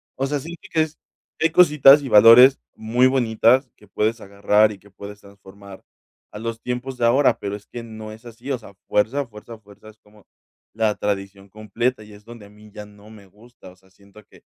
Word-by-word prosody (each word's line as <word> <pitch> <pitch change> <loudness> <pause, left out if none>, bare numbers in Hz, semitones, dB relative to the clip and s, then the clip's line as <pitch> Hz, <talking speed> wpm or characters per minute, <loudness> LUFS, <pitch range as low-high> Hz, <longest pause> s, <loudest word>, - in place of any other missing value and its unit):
o 135 - -3
sea, 145 +1 -3
siento 165 +5 -11
que 160 - +1
es 155 0 -9 0.4
que - - 0
hay - - -14
cositas 150 -5 +5
y 135 - -6
valores 115 +5 +7 0.2
muy 115 +3 0
bonitas 125 0 +1
que 105 - -22
puedes 110 +4 -2
agarrar 105 +2 +1
y 100 - -12
que 100 - -21
puedes 100 +2 -12
transformar 100 0 -16 0.5
a 105 - -9
los 115 0 -6
tiempos 125 +1 -6
de 120 - -1
ahora. 130 +4 +2
Pero 100 0 -5
es 105 0 -14
que 120 - -9
no 110 -1 -10
es 110 +2 -15
así. 120 +4 -9
O 135 - -1
sea, 105 -3 -16
fuerza, 130 +7 -1
fuerza, 115 +1 -13
fuerza, 105 +1 -18
es 110 - -19
como 105 0 -24 0.5
la 110 -1 -1
tradición 100 -1 -5
completa 110 +3 -4
y 105 0 -16
es 105 0 -17
donde 115 -2 -13
a - - -20
mí 105 +1 -19
ya 105 0 -10
no 105 0 -18
me 105 -2 -16
gusta. 105 +1 -18
O - - -21
sea, 95 0 -28
siento 100 +2 -20
que - - -22
110 Hz, 220 wpm, -21 LUFS, 105-125 Hz, 0.5 s, valores